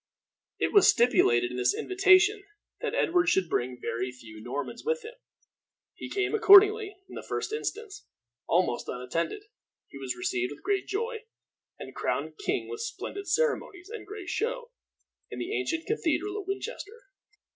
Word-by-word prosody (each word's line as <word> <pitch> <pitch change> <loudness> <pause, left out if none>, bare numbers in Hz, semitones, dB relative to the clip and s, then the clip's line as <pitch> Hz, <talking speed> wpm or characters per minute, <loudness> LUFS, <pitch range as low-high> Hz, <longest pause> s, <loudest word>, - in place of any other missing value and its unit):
It - - -1
was 405 -3 +7
stipulated 125 - +4
in 125 - -5
this 125 0 +2
invitation 390 +2 +4 0.4
that - - -3
Edward 345 0 +2
should 190 -2 +2
bring 125 -4 -2
very 125 +2 -3
few 110 -3 -13
Normans 145 - -5
with 475 +2 -1
him. 455 - -8 0.8
He - - -8
came, 400 +1 -1
accordingly, 415 -1 +7
in - - -13
the - - -6
first - - -4
instance, 440 -2 -5 0.4
almost 175 -8 +1
unattended. 165 - -3 0.5
He 140 - -10
was 130 -2 -3
received 125 +1 -2
with - - -16
great 400 -1 0
joy, 460 +2 -3 0.5
and - - -9
crowned - - -3
king 405 - -1
with 445 0 -6
splendid 400 -3 -6
ceremonies 400 -2 -1
and 450 - -8
great 405 -3 -7
show, 485 +5 -2 0.6
in - - -7
the 370 +4 -4
ancient 330 -5 -2
cathedral 405 0 -1
at 380 - -15
Winchester. 430 +3 -6
390 Hz, 155 wpm, -28 LUFS, -, 0.8 s, was